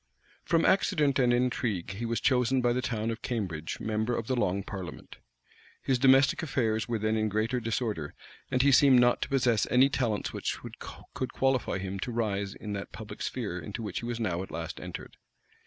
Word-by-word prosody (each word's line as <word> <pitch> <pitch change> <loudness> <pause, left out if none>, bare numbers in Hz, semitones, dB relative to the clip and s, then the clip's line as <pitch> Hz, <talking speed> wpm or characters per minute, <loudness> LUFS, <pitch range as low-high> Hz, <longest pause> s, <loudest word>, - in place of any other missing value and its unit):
From 165 -1 +2
accident 155 -8 +3
and 125 -2 +4
intrigue 120 -7 0
he 115 +4 -4
was 115 -1 -1
chosen 130 0 +2
by 120 -1 +2
the 125 - 0
town 115 -3 -2
of 115 - -6
Cambridge 90 -10 -3
member 110 +2 -1
of 115 - -3
the 130 - 0
long 100 -4 0
parliament. 95 -3 -8 0.6
His 130 -2 0
domestic 135 +3 +5
affairs 115 -8 0
were 120 -1 -1
then 110 +1 0
in 110 -1 +1
greater 110 +4 0
disorder; 110 - -3 0.3
and 130 0 +2
he 140 - +5
seemed 135 -1 +7
not 120 0 +3
to - - -2
possess 125 -6 +2
any 130 +2 +5
talents 115 -7 -1
which - - -2 0.6
could 130 - -4
qualify 135 -6 +1
him 95 0 -4
to 120 +5 -3
rise 100 -4 -2
in 105 -1 -6
that 100 0 -5
public 110 -2 -9
sphere 100 -8 -3
into 85 +8 -6
which 105 -4 -3
he - - -6
was 120 -1 -3
now 90 -6 -1
at 95 - -7
last - - -5
entered. - - -8
115 Hz, 195 wpm, -29 LUFS, 105-125 Hz, 0.6 s, seemed